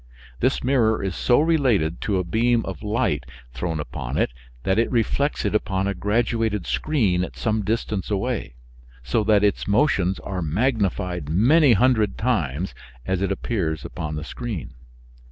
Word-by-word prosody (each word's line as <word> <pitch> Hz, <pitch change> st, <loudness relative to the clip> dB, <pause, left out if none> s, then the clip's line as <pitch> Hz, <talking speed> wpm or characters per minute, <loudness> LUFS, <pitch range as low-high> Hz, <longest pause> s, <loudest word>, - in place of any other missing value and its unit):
This -, -, +1 dB
mirror 120 Hz, -5 st, +2 dB
is 95 Hz, -1 st, -2 dB
so 120 Hz, -, +3 dB
related 130 Hz, -, +2 dB
to 100 Hz, -3 st, 0 dB
a 90 Hz, -, 0 dB
beam 115 Hz, +6 st, +1 dB
of 95 Hz, -, -6 dB
light 105 Hz, +2 st, 0 dB, 0.3 s
thrown 80 Hz, +6 st, -3 dB
upon 75 Hz, -, -4 dB
it -, -, +1 dB, 0.3 s
that 95 Hz, +3 st, +2 dB
it 115 Hz, -, +2 dB
reflects 135 Hz, +4 st, 0 dB
it -, -, 0 dB
upon 95 Hz, -2 st, 0 dB
a 100 Hz, -, 0 dB
graduated 110 Hz, -2 st, 0 dB
screen 105 Hz, -13 st, +1 dB
at -, -, -7 dB
some 110 Hz, -1 st, 0 dB
distance 105 Hz, -1 st, -2 dB
away, 105 Hz, -, -2 dB, 0.5 s
so 105 Hz, -, +1 dB
that 105 Hz, -1 st, +3 dB
its 105 Hz, -, +1 dB
motions 100 Hz, -5 st, +2 dB
are 95 Hz, -2 st, -4 dB
magnified 90 Hz, -, -1 dB
many 125 Hz, -, +5 dB
hundred 110 Hz, -2 st, +2 dB
times 95 Hz, -, -1 dB, 0.3 s
as 95 Hz, -1 st, -1 dB
it 100 Hz, 0 st, 0 dB
appears 95 Hz, -6 st, -2 dB
upon 75 Hz, -3 st, -5 dB
the 75 Hz, -, -4 dB
screen. 110 Hz, -, -6 dB
105 Hz, 155 wpm, -23 LUFS, 90-115 Hz, 0.5 s, many